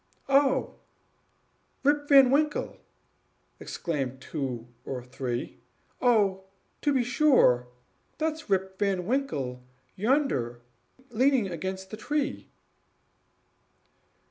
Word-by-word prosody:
"Oh, 270 Hz, -1 st, +2 dB, 1.1 s
Rip 290 Hz, +1 st, +2 dB
Van 270 Hz, -3 st, +8 dB
Winkle!" 295 Hz, +1 st, +1 dB, 0.8 s
exclaimed 135 Hz, -6 st, -4 dB
two 130 Hz, -5 st, -5 dB, 0.2 s
or 130 Hz, -2 st, -5 dB
three. 125 Hz, -1 st, -5 dB, 0.4 s
"Oh, 200 Hz, -6 st, +3 dB, 0.4 s
to 290 Hz, -, +2 dB
be 260 Hz, -3 st, +2 dB
sure! 245 Hz, -, +4 dB, 0.5 s
that's 315 Hz, -3 st, -3 dB
Rip 190 Hz, -1 st, 0 dB
Van 195 Hz, -3 st, 0 dB
Winkle 150 Hz, -, -2 dB, 0.3 s
yonder, 205 Hz, -, 0 dB, 0.5 s
leaning 250 Hz, -3 st, +2 dB
against 190 Hz, +3 st, -5 dB
the 215 Hz, -, -6 dB
tree." 295 Hz, +4 st, -2 dB
205 Hz, 90 wpm, -28 LUFS, -, 1.1 s, Van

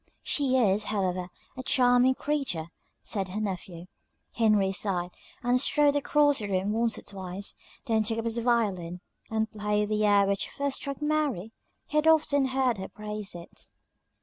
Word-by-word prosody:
"She 265 Hz, -3 st, +2 dB
is, 210 Hz, -3 st, +2 dB
however, 185 Hz, -3 st, -1 dB, 0.3 s
a 260 Hz, -, -5 dB
charming 250 Hz, 0 st, +4 dB
creature," 260 Hz, -, -2 dB, 0.3 s
said 195 Hz, -3 st, 0 dB
her 190 Hz, +3 st, -4 dB
nephew. 185 Hz, -4 st, -5 dB, 0.5 s
Henry 210 Hz, -4 st, +3 dB
sighed, 180 Hz, -2 st, -1 dB, 0.3 s
and 245 Hz, +1 st, +3 dB
strode 290 Hz, 0 st, +3 dB
across 290 Hz, 0 st, +3 dB
the 210 Hz, -, -4 dB
room 190 Hz, +1 st, 0 dB
once 225 Hz, 0 st, +1 dB
or -, -, -9 dB
twice; 190 Hz, 0 st, -4 dB, 0.3 s
then 220 Hz, -1 st, +2 dB
took 225 Hz, +1 st, 0 dB
up 225 Hz, -, -3 dB
his 230 Hz, 0 st, 0 dB
violin, 200 Hz, -8 st, 0 dB, 0.3 s
and 220 Hz, 0 st, -1 dB
played 210 Hz, -1 st, -1 dB
the 215 Hz, 0 st, +1 dB
air 205 Hz, -1 st, +5 dB
which 200 Hz, 0 st, -1 dB
first 280 Hz, -1 st, -2 dB
struck 280 Hz, +1 st, -6 dB
Mary; 295 Hz, -, 0 dB, 0.3 s
he 300 Hz, -, -3 dB
had 300 Hz, +1 st, +3 dB
often 295 Hz, -3 st, +4 dB
heard 260 Hz, -4 st, +1 dB
her 190 Hz, -, -5 dB
praise 210 Hz, -2 st, -6 dB
it. 170 Hz, 0 st, -9 dB
215 Hz, 165 wpm, -28 LUFS, 195-260 Hz, 0.5 s, air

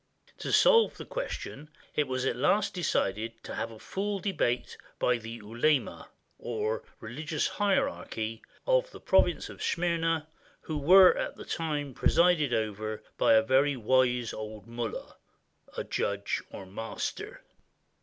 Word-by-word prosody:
To -, -, -3 dB
solve 460 Hz, -2 st, +5 dB
the -, -, -7 dB
question, 155 Hz, -, -5 dB, 0.2 s
it 150 Hz, -, +1 dB
was 130 Hz, 0 st, -2 dB
at 125 Hz, -, +1 dB
last 190 Hz, +11 st, +2 dB
decided 115 Hz, -, -1 dB
to -, -, -7 dB
have 115 Hz, -, -3 dB
a 115 Hz, -, -11 dB
full 200 Hz, -, -3 dB
debate 175 Hz, -11 st, -1 dB, 0.2 s
by 125 Hz, -1 st, +2 dB
the 115 Hz, 0 st, -8 dB
ulema 120 Hz, +6 st, -1 dB, 0.9 s
[religious 150 Hz, +8 st, -2 dB
hierarchy] 115 Hz, -, -1 dB, 0.2 s
of -, -, +3 dB
the -, -, -12 dB
province -, -, +2 dB
of -, -, -11 dB
Smyrna, 165 Hz, -2 st, 0 dB, 0.4 s
who 155 Hz, -2 st, -4 dB
were 185 Hz, +5 st, +8 dB
at -, -, -3 dB
the -, -, -10 dB
time 150 Hz, -4 st, -2 dB
presided 170 Hz, -1 st, +3 dB
over 110 Hz, -1 st, -2 dB, 0.2 s
by -, -, +5 dB
a 110 Hz, 0 st, +6 dB
very 135 Hz, +3 st, +3 dB
wise 125 Hz, 0 st, +2 dB
old 110 Hz, -2 st, -7 dB
mollah 115 Hz, -1 st, -5 dB, 0.7 s
[judge, 100 Hz, 0 st, -1 dB
or 95 Hz, -, -9 dB
master]. 105 Hz, +4 st, -5 dB
130 Hz, 135 wpm, -29 LUFS, 115-170 Hz, 0.9 s, were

